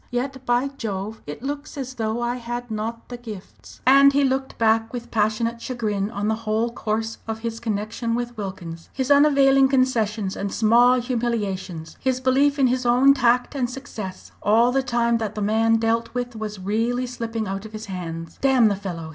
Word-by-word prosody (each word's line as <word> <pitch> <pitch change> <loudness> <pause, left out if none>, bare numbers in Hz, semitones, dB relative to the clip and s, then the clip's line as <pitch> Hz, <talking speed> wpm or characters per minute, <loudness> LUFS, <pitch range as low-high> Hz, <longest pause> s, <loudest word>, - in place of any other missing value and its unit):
Yet, 265 +2 -3
by 245 +3 +2
Jove! 210 0 -4
it 150 +10 -7
looks 285 +1 -5
as 260 -2 -5
though 225 -1 -2
I 240 +1 -1
had 240 0 -5
not 225 +2 -4
the 245 - -6
gifts." 220 -6 -11
And 275 +2 +7
he 285 +1 +3
looked 265 0 -1
back 225 0 +2
with 240 -1 -7
passionate 230 +2 0
chagrin 215 -6 -2
on 210 -2 -3
the 220 - +2
whole 225 +1 -1
course 225 -1 -3
of 220 0 -4
his 225 -1 -4
connection 225 +1 -2
with 240 0 -3
Wilkins, 180 -5 -7
his 265 +1 -1
unavailing 275 -2 +5
concessions 225 -7 +1
and 200 0 -3
small 240 +3 +4
humiliations, 205 -9 -3
his 260 -1 0
belief 270 +3 +3
in 275 - +4
his 255 0 +1
own 250 +3 +5
tact 245 -1 +2
and 255 -4 -1
success, 240 -8 -8
all 230 +4 +4
the 270 +1 +2
time 235 -2 +1
that 215 -2 -3
the - - -3
man 225 +2 +3
dealt 225 +1 0
with 245 -1 -3
was 215 -1 -5
really 225 +6 0
slipping 230 -3 -4
out 195 +1 -4
of - - -16
his 215 0 -7
hands. 165 -4 -6
"Damn 260 -5 +5
the 200 - 0
fellow!" 175 -5 -6
230 Hz, 190 wpm, -23 LUFS, 215-250 Hz, -, And